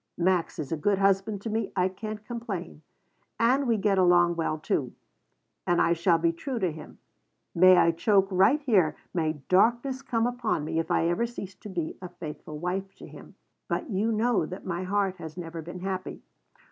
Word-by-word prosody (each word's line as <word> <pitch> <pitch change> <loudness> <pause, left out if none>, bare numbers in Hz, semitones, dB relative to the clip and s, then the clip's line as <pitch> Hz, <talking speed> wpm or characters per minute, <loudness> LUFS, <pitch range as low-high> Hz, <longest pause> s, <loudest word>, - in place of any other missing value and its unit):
Max 175 -1 +1
is 150 -4 -5
a 165 - 0
good 200 +6 +1
husband 195 +1 +1
to 225 - -3
me. 220 -1 -2
I 180 -1 +3
can't 210 +3 -7
complain. 205 - -6 0.6
And 255 +4 +3
we 230 -2 +2
get 195 -1 +2
along 175 -1 +4
well, 160 -2 -1
too. 140 -4 -2 0.7
And 175 0 +3
I 170 - +4
shall 170 0 +3
be 165 0 +2
true 245 +10 -5
to 185 -6 0
him. 155 - -11 0.6
May 185 +1 +7
I 170 -1 +5
choke 195 +3 +2
right 195 +10 +4
here, 195 - +2 0.2
may 160 -3 0
darkness 240 +7 +2
come 235 -4 0
upon 245 -10 -1
me, 160 - -1
if 165 +1 -3
I 170 -1 +2
ever 175 +8 +1
cease 200 -5 -8
to 210 - -11
be 170 -4 -4
a 180 - -7
faithful 155 -3 -8
wife 190 +4 -3
to - - -12
him. - - -13 0.3
But - - -3
you 210 +4 +1
know 225 -5 +1
that 185 - -8
my 175 -1 -3
heart 190 0 0
has 160 -1 -9
never 165 -1 -6
been 175 +3 -8
happy. 190 -1 -4
185 Hz, 195 wpm, -27 LUFS, 170-215 Hz, 0.7 s, May